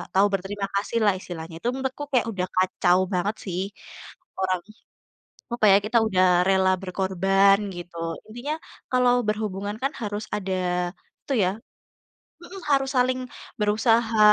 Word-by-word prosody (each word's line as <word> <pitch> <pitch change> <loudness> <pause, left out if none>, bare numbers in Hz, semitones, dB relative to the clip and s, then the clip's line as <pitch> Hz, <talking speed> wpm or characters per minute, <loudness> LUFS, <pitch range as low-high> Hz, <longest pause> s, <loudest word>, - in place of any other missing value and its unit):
tahu 195 +1 +6
berterima 195 +1 -3
kasihlah, 205 +1 +1
istilahnya, 165 -3 -8
itu 230 - -4
menurutku 265 +2 -3
kayak 250 -3 +2
udah 185 -3 -2
kacau 185 -1 +3
banget 195 +4 0
sih 185 -2 -2 0.8
orang 185 -1 0 0.9
apa 240 -2 +2
ya, 195 - +8
kita 225 +3 +2
udah 185 -3 +3 0.3
rela 190 -1 +4
berkorban, 195 +1 +3 0.2
gitu. 175 0 -9 0.3
Intinya, 240 +7 -4 0.4
kalau 250 -1 +4
berhubungan 210 -1 -2
kan 275 - +1
harus 210 -1 -3
ada 195 -2 -3 0.7
itu 280 - -2
ya - - +2 0.9
mhm, 375 +3 -9
harus 270 -1 +3
saling 255 +1 +2 0.4
berusaha, 225 +2 +2
205 Hz, 130 wpm, -25 LUFS, 190-235 Hz, 0.9 s, ya